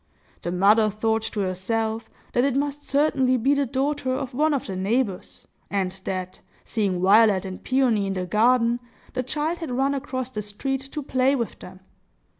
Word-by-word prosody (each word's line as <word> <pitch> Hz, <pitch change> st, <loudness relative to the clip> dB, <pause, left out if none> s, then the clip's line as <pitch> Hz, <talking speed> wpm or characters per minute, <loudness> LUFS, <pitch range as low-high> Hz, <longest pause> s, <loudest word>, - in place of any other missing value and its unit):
The 175 Hz, -, -3 dB
mother 210 Hz, +4 st, +4 dB
thought 220 Hz, +2 st, 0 dB
to 210 Hz, -, -2 dB
herself 220 Hz, +4 st, -2 dB, 0.2 s
that 245 Hz, -, +3 dB
it 275 Hz, -2 st, +1 dB
must 290 Hz, +1 st, -1 dB
certainly 265 Hz, -3 st, +3 dB
be 265 Hz, +4 st, +2 dB
the 280 Hz, -1 st, +1 dB
daughter 275 Hz, +1 st, -1 dB
of 265 Hz, -2 st, -4 dB
one 305 Hz, +5 st, +2 dB
of 280 Hz, -3 st, -1 dB
the 190 Hz, -, -5 dB
neighbors, 200 Hz, +1 st, -2 dB, 0.2 s
and 190 Hz, -2 st, 0 dB
that, 185 Hz, -1 st, -4 dB, 0.3 s
seeing 200 Hz, -5 st, 0 dB
Violet 200 Hz, -1 st, +5 dB
and 185 Hz, -1 st, -7 dB
Peony 245 Hz, -6 st, +2 dB
in 195 Hz, -, -1 dB
the 185 Hz, -1 st, -2 dB
garden, 235 Hz, +4 st, +3 dB, 0.3 s
the 255 Hz, -, -1 dB
child 300 Hz, +6 st, -2 dB
had 325 Hz, -, -5 dB
run 270 Hz, +3 st, +1 dB
across 260 Hz, -2 st, -4 dB
the 210 Hz, -, -3 dB
street 255 Hz, +7 st, -3 dB
to 300 Hz, -, -3 dB
play 265 Hz, 0 st, +2 dB
with 235 Hz, -4 st, -3 dB
them. 185 Hz, +1 st, -12 dB
235 Hz, 180 wpm, -24 LUFS, 200-270 Hz, 0.3 s, Violet